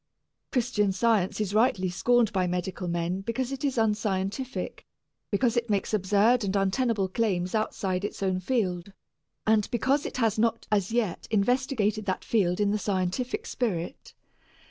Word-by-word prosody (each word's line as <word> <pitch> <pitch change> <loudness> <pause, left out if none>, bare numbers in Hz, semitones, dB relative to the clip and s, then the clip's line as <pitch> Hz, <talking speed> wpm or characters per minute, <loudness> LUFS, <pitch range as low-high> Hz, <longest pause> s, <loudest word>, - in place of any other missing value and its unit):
Christian 230 -5 +1
Science 200 -1 +1
is 205 -2 -1
rightly 215 -4 +3
scorned 225 +5 +2
by 185 -2 +1
medical 180 +1 -3
men 175 +2 -1
because 235 +5 -2
it 275 0 -5
is 275 -3 0
unscientific, 210 +2 -1 0.5
because 230 +3 +1
it 240 -1 0
makes 205 +1 0
absurd 210 +4 +3
and 195 0 -1
untenable 195 +1 +1
claims 185 -3 -1
outside 195 -3 -1
its 205 - -4
own 185 -1 +1
field, 185 -4 -1 0.5
and 215 -1 +3
because 265 +4 +1
it - - -6
has 225 -3 +1
not 230 0 +1
as 200 -1 +1
yet 225 -6 -1
investigated 220 -1 +1
that 185 - -1
field 185 -5 +1
in 205 -1 +2
the 210 - 0
scientific 205 - -1
spirit. 205 - -3
210 Hz, 150 wpm, -27 LUFS, 190-235 Hz, 0.5 s, rightly